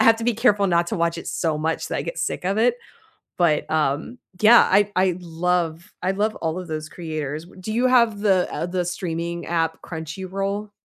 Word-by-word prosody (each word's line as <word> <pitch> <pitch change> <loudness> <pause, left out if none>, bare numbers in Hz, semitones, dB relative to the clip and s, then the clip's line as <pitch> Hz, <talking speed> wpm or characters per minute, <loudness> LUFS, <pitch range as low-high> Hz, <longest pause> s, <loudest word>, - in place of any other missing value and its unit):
I - - +5
have 225 0 +6
to 225 - -5
be 240 - +2
careful 210 -3 +3
not 170 -2 +2
to - - -2
watch 170 0 0
it - - -8
so 160 -3 -1
much 160 +1 -1
that - - -2
I - - -2
get - - -5
sick - - -2
of 195 +3 0
it. 240 +2 +4 0.6
But, 165 -4 +2
um 155 - 0 0.2
yeah, 230 +3 +7
I 205 +2 +4
I 185 -1 +2
love 170 -1 -2
I 185 - +2
love 210 +2 -1
all 160 0 -2
of 180 - -9
those 155 -1 -4
creators, 155 -3 -5
w 185 +2 -15
do 215 +4 -4
you 245 +3 +2
have 235 -5 +4
the, 190 -4 +3
uh 160 - -2
the 180 0 -1
streaming 170 -1 -4
app 165 -1 -1
Crunchyroll? 190 +5 -4
180 Hz, 215 wpm, -23 LUFS, 165-205 Hz, 0.6 s, yeah